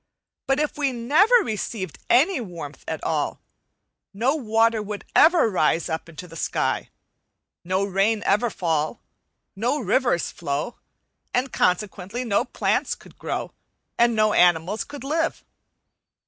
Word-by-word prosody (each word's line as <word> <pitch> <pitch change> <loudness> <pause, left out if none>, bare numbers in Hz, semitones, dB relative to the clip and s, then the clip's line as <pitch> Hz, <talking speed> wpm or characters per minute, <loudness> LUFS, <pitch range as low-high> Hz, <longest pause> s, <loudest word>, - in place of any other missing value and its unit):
But 270 +1 +2
if 300 0 -2
we 280 -2 +1
never 295 - +3
received 205 -5 -4
any 295 +4 +4
warmth 170 -8 -8
at 160 -1 -4
all, 155 -3 -1 0.8
no 245 +7 +2
water 225 -4 +2
would 210 0 -6
ever 330 -3 +6
rise 170 -4 +1
up 160 +1 -4
into 165 +2 -9
the 165 - -13
sky, - - -1 0.7
no 185 +2 0
rain 200 +3 +1
ever 210 +5 +2
fall, 165 -2 -1 0.6
no 245 +9 0
rivers 240 -4 +1
flow, 150 +7 -3 0.6
and 255 +2 0
consequently 195 +4 0
no 205 -4 +2
plants - - 0
could - - -18
grow - - -3 0.5
and 235 -1 +4
no 215 -1 +3
animals 175 +4 +3 0.2
live. 320 +4 -1
215 Hz, 130 wpm, -24 LUFS, 175-250 Hz, 0.8 s, ever